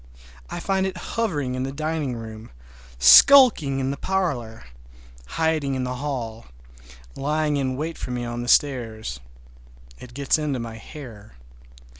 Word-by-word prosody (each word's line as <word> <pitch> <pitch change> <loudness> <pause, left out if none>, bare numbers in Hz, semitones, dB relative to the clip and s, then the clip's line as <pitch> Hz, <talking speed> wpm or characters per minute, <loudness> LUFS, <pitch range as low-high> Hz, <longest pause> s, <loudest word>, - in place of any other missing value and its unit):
I - - -5
find 190 -1 0
it 185 -1 -6 0.2
hovering 150 - -1
in 130 - -3
the 135 +1 -3
dining 155 -2 -3
room, 110 -1 -9 0.5
skulking 160 - +7
in 135 0 -1
the 140 - -5
parlor, 140 - -2 0.7
hiding 155 -4 0
in 130 - -2
the 125 0 -4
hall, 120 -5 -5 0.7
lying 150 +1 0
in 130 -2 -2
wait 160 +3 -4
for - - -6
me 125 -1 -3
on 120 0 -4
the 120 - -6
stairs. 115 - +1 0.8
It 125 -1 -12
gets 140 +2 +1
into 150 -3 -2
my 115 -1 -6
hair. 115 - -12
135 Hz, 145 wpm, -23 LUFS, 120-155 Hz, 0.8 s, skulking